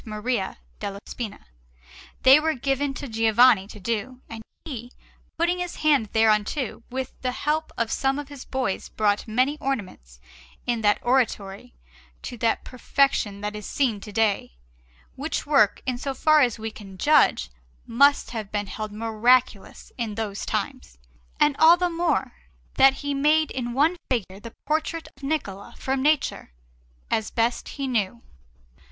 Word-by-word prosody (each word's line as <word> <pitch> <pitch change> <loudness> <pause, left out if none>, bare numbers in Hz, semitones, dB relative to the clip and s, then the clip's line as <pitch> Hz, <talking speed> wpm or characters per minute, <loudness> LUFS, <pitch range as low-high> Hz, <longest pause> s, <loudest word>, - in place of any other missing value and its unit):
Maria 215 -1 -3 0.2
della 200 0 -4
Spina, 225 -4 -7 0.8
they 265 +3 +8
were 315 +1 0
given 275 +2 -1
to 275 +1 -7
Giovanni 225 -2 +4
to 210 - -11
do, 230 +4 -3
and 225 -1 -7 0.2
he, 245 -6 -7 0.5
putting 345 +2 +1
his 355 -1 -4
hand 290 -8 +2
thereunto, 220 +4 +1
with 260 +1 -4
the 255 - -1
help 310 +3 -1
of 230 -1 -1
some 270 0 0
of 290 -1 -5
his 285 -2 -10
boys 255 -8 -3
brought 210 0 0
many 255 +7 +1
ornaments 185 - -5 0.5
in 240 -2 -1
that 205 -1 +3
oratory 205 - -1 0.5
to - - -6
that 230 - +1
perfection 250 -5 0
that 210 0 -4
is 210 -1 -7
seen 245 -7 0
to 210 - -10
day; 210 - 0 0.6
which 295 +4 -3
work, 275 -9 +3
in 255 -2 -2
so 275 0 -3
far 310 +3 +4
as 240 -5 +2
we 220 0 -5
can 195 -3 -12
judge, 185 - +3 0.3
must 280 +5 +3
have 220 -4 -5
been 205 -1 -1
held 215 +2 -6
miraculous 225 0 +1
in 220 -3 -3
those 210 -2 -4
times, - - -4 0.4
and 295 -1 +4
all 330 +2 +7
the 355 0 0
more 335 -1 0 0.4
that 270 0 +6
he 285 - 0
made 300 +2 +2
in 240 -2 -3
one 300 +7 +3
figure 200 -6 -2
the 230 +2 -11
portrait 315 +2 -1
of - - -22
Niccola 275 -10 -4
from 265 0 -1
nature, 295 - 0 0.6
as 220 -1 0
best 230 +1 -1
he 275 -1 -2
knew. 230 -2 -1
245 Hz, 155 wpm, -24 LUFS, 215-280 Hz, 0.8 s, they